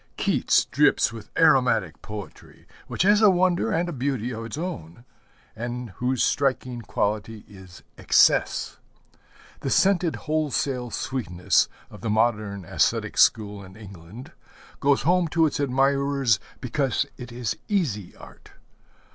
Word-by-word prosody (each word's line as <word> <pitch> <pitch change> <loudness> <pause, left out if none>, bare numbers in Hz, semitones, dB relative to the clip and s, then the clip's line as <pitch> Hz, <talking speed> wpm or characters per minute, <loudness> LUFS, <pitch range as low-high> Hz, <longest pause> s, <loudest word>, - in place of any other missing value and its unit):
Keats - - +2
drips - - +2
with 110 -1 -10
aromatic 125 - +3
poetry, 105 -6 -10 0.2
which - - -1
has 205 +2 +4
a 215 - +7
wonder 180 -1 +2
and 170 +2 0
a 175 - -4
beauty 125 -3 -2
of 115 0 -6
its 115 - -7
own 120 - -6 0.5
and 120 0 -5
whose 125 0 0
striking 130 -3 0
quality 105 0 -3
is 95 -3 -14 0.2
excess. - - +2 0.8
The - - -3
scented, 185 -4 +2
wholesale 145 -5 -1
sweetness 100 -7 0 0.2
of 105 - -12
the 115 - -3
modern 105 -3 0
æsthetic - - 0
school 105 -2 +3
in 95 0 -14
England 105 - -12 0.5
goes 140 0 +2
home 175 +2 +2
to 160 +1 +2
its 150 - -2
admirers 135 -3 +1 0.2
because 135 +1 -1
it 125 -1 -9
is 120 -2 -3
easy 130 - -2
art. - - -16
125 Hz, 130 wpm, -24 LUFS, 105-145 Hz, 0.8 s, a